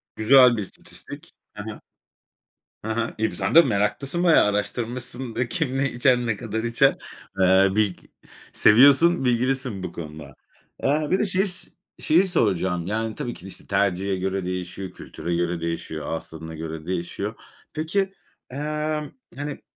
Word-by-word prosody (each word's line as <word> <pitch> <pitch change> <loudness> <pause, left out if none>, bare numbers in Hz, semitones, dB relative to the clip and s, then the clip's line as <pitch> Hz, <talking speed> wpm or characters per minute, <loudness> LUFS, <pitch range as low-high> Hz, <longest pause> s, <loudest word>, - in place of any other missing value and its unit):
Güzel 125 +1 +6
bir - - -1
istatistik. 100 - -9 0.2
Ha 105 0 -8
ha. 110 - -8 1.0
Ha 110 +1 -3
ha. 115 0 -2
İii, 110 -2 0
bi - - -9
sen 100 - -2
de 165 - +11
meraklısın 135 - -1
bayağı 170 -10 +6
araştırmışsın 120 +4 -2
da: 120 +1 -1
Kim 155 -7 -1
ne 140 0 0
içer, 125 +1 +3
ne 115 -4 -2
kadar 110 -1 -4
içer? 115 0 +3 0.4
Eee, 95 +1 +5
bilg 105 -4 +1 0.6
seviyorsun, 140 +8 +6
bilgilisin 125 -4 0
bu - - -4
konuda. 75 -3 -9 0.5
Aaa, 150 +2 +1
bir 185 - +3
de - - +2
şeys 190 -1 0 0.3
şeyi 175 +5 +3
soracağım. 95 - 0
Yani 110 +1 -2
tabii 120 - -4
ki 90 - -13
de, - - -7
işte, 95 - -11
tercihe 95 -1 0
göre 95 0 -2
değişiyor, 90 +1 -5
kültüre 85 0 -5
göre 85 0 -1
değişiyor, 80 -2 -4
ağız 80 - -4
tadına 80 0 -9
göre 80 0 -6
değişiyor. 95 +4 -3 0.4
Peki, 190 +6 -1 0.4
emm, 150 +2 -3 0.2
hani, 145 +1 -5
110 Hz, 155 wpm, -24 LUFS, 95-140 Hz, 1.0 s, de